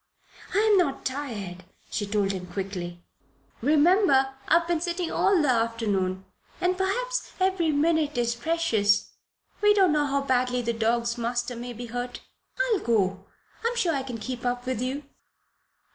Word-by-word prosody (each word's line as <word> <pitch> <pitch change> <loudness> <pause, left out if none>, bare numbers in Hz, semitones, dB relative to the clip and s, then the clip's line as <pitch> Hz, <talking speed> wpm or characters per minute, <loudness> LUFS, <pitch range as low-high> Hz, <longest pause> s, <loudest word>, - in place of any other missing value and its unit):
"I - - +3
am 420 -2 +5
not 280 -6 0
tired," 215 -10 -4 0.3
she 205 - -2
told 200 -1 +1
him, 185 -2 -5
quickly. 175 -2 -5 0.6
"Remember 295 - +4
I've 335 +1 +4
been 340 -2 0
sitting 345 0 -2
all 390 -2 +3
the 300 - +2
afternoon. 215 -6 0 0.3
And 360 0 +1
perhaps - - -1
every 370 -4 +2
minute 305 -1 +1
is 235 -1 +1
precious. 235 -7 +1 0.5
We 415 0 +5
don't 380 -4 +5
know 295 -1 +2
how 280 0 +1
badly 250 -2 +1
the 235 0 0
dog's 235 +1 0
master 240 +1 -2
may 240 +1 -6
be 240 +1 -7
hurt. 245 +1 -5 0.5
I'll 410 - +2
go. 195 - 0 0.4
I'm 470 +1 0
sure 350 -8 +1
I 275 - 0
can 255 -3 -6
keep 245 +2 -5
up 245 0 -1
with 255 -3 -2
you." 265 +3 -2
255 Hz, 160 wpm, -26 LUFS, 230-335 Hz, 0.6 s, am